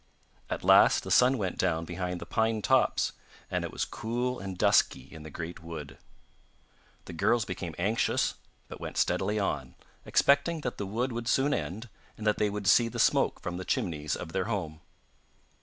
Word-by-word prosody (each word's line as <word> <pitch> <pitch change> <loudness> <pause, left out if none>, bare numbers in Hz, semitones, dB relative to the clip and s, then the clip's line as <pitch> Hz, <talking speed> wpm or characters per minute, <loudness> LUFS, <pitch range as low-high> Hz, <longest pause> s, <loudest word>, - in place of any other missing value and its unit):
At - - -3
last - - +6
the - - -6
sun 130 +2 +5
went 95 -5 -3
down 80 0 0
behind 90 +1 -4
the - - -7
pine 110 -1 0
tops, 130 -1 +2 0.4
and - - -1
it - - -4
was - - -2
cool 120 +3 -3
and 95 -1 -6
dusky 65 - +3
in 80 - -10
the 80 - -9
great 80 +3 -7
wood. 75 -5 -8 1.1
The - - -8
girls 110 +7 +2
became 85 -4 -5
anxious 105 +6 +1 0.3
but - - -10
went - - -6
steadily 105 +1 +1
on, 70 -10 -2 0.3
expecting 150 +4 +2
that 125 -4 -4
the 100 - -3
wood 120 +6 -1
would 115 0 -4
soon 135 +4 +2
end, 110 +3 -4 0.3
and 110 - -7
that 105 - +2
they 105 - +2
would 105 0 -5
see 115 +4 +5
the 115 - -6
smoke - - +2
from 90 0 -4
the 95 - -5
chimneys 80 - -1
of 80 - -7
their 95 +1 -1
home. 85 -8 -4
100 Hz, 185 wpm, -29 LUFS, 85-120 Hz, 1.1 s, last